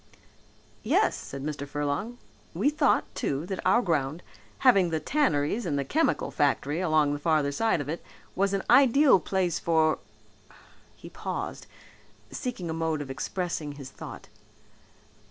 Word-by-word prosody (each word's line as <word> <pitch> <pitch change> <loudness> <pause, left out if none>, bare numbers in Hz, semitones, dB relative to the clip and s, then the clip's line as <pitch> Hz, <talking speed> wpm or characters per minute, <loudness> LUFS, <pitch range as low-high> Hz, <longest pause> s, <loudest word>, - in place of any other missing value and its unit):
"Yes," - - +2
said 135 0 -7
Mr. 145 -1 -4
Furlong. 145 - -3 0.4
"We 230 - +2
thought, 300 - +2
too, 140 +3 -2
that 190 0 -4
our 240 - +4
ground, 155 -2 -1 0.4
having 195 -9 +6
the 160 -1 -1
tanneries 205 - +1
and 155 -7 -1
the 140 - -1
chemical 320 +2 0
factory 145 +2 0
along 155 -4 +2
the 145 - -3
farther 150 -2 +1
side 220 +5 +1
of 145 - -4
it, 160 +3 -4 0.3
was 195 +1 +1
an 195 - -2
ideal 275 -4 +6
place 180 -1 -1
for 160 -1 +2 0.5
" - - -24
he - - -12
paused, - - -5 0.6
seeking 245 -10 -4
a 160 - -2
mode 160 -2 -1
of 135 - -8
expressing 160 +1 -3
his 140 -2 -10
thought. - - -10
160 Hz, 150 wpm, -27 LUFS, 145-195 Hz, 0.6 s, having